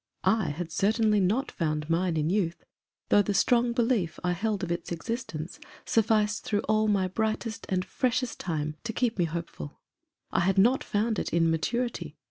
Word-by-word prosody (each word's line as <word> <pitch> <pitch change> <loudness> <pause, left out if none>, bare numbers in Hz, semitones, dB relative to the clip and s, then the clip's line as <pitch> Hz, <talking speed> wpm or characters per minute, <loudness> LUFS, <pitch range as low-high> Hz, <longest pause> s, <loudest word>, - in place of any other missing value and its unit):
I 220 -5 +3
had 165 +3 -5
certainly 210 +3 +2
not 215 +9 +1
found 155 -2 -2
mine 170 0 +1
in 155 +2 +1
youth, 170 -4 -1 0.4
though 205 - +6
the 205 0 -1
strong 240 +3 +3
belief 235 -7 0
I 180 - +1
held 205 +2 -1
of 170 - -2
its 170 - -3
existence 175 -3 -4 0.3
sufficed 215 -1 +2
through 205 -1 0
all 215 0 +2
my 195 -3 +2
brightest 220 +3 -2
and 185 -1 0
freshest 255 -1 -1
time 155 -3 -3
to 230 -1 -3
keep 235 -3 0
me 175 - +4
hopeful. 160 - -6 0.5
I - - +2
had 190 +2 +2
not 240 +7 +4
found 215 0 0
it - - -3
in 165 -1 +3
maturity. 235 +10 -2
200 Hz, 175 wpm, -28 LUFS, 170-225 Hz, 0.5 s, though